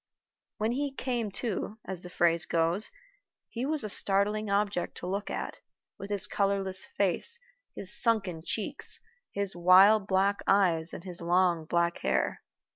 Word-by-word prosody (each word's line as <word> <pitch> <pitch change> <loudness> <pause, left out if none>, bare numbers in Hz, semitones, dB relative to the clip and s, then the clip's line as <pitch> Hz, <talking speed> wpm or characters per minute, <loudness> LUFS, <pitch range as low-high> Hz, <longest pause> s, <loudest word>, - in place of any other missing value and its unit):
When 220 +2 -1
he 280 +3 -2
"came 245 -5 -3
to," 215 -2 -4
as 190 -2 -5
the 180 - -10
phrase 170 -2 +1
goes, 170 +5 +1 0.6
he 245 +3 -4
was 305 -4 +2
a - - -2
startling 205 +2 +4
object 200 -2 -1
to - - -7
look 195 +3 -3
at, - - -5 0.4
with 200 +1 -8
his 205 -1 -1
colorless 195 -2 -1
face, 200 - +1 0.4
his 190 +1 0
sunken 195 -8 +1
cheeks, 210 +4 0 0.3
his 200 -2 -3
wild 190 +4 +5
black 195 +1 +1
eyes, 180 -4 +2
and - - -9
his 180 -2 -8
long 175 -1 +1
black 170 +1 0
hair. - - -1
195 Hz, 150 wpm, -29 LUFS, 180-210 Hz, 0.6 s, wild